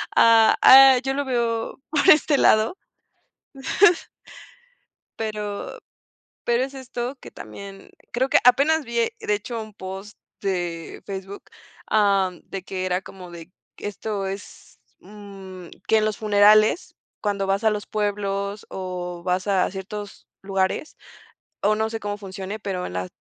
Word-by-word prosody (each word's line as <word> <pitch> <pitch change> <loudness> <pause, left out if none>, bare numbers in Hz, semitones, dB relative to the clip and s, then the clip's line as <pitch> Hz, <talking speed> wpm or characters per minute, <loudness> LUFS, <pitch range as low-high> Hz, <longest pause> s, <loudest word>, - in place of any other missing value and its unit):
ah, 225 -1 +6
ah, 265 0 +9
yo 270 - -1
lo 285 +1 -2
veo 235 -2 -2
por 295 -2 +1
este 300 -1 +6
lado. 220 - +3 2.4
Pero 210 -2 -5 0.7
pero 240 +1 +1
es 270 +1 -6
esto 255 0 -5
que - - -11
también, 195 -1 -11 0.2
creo 255 +2 0
que - - +4
apenas 285 +6 +4
vi, 235 -2 -5 0.2
de 210 - -1
hecho, 230 +2 -5
un 215 -1 -10
post 195 +1 -8 0.2
de 175 -4 -3
Facebook, 195 0 -7 0.4
am, 195 -4 +2
de 195 -2 -7
que 185 0 -4
era 180 0 0
como 180 -2 -12
de 170 0 -11 0.3
esto 205 0 -4
es, 195 +1 -9 0.2
mm 195 -3 -11 0.2
que 220 - +4
en 215 - +2
los 215 -1 -2
funerales, 215 - +4 0.3
cuando 200 -2 -1
vas 195 +2 0
a 220 - +5
los 210 -1 -3
pueblos 205 -1 -2
o 180 -2 -6
vas 185 +1 -1
a 195 -2 +2
ciertos 200 +1 -8
lugares, 195 +8 -2 0.6
o 210 +2 +3
no 220 +1 -1
sé 225 0 -5
cómo 205 0 -4
funcione, 195 +1 -7
pero 190 -3 -4
en 90 - -7
la 90 0 -3
205 Hz, 140 wpm, -23 LUFS, 190-225 Hz, 2.4 s, ah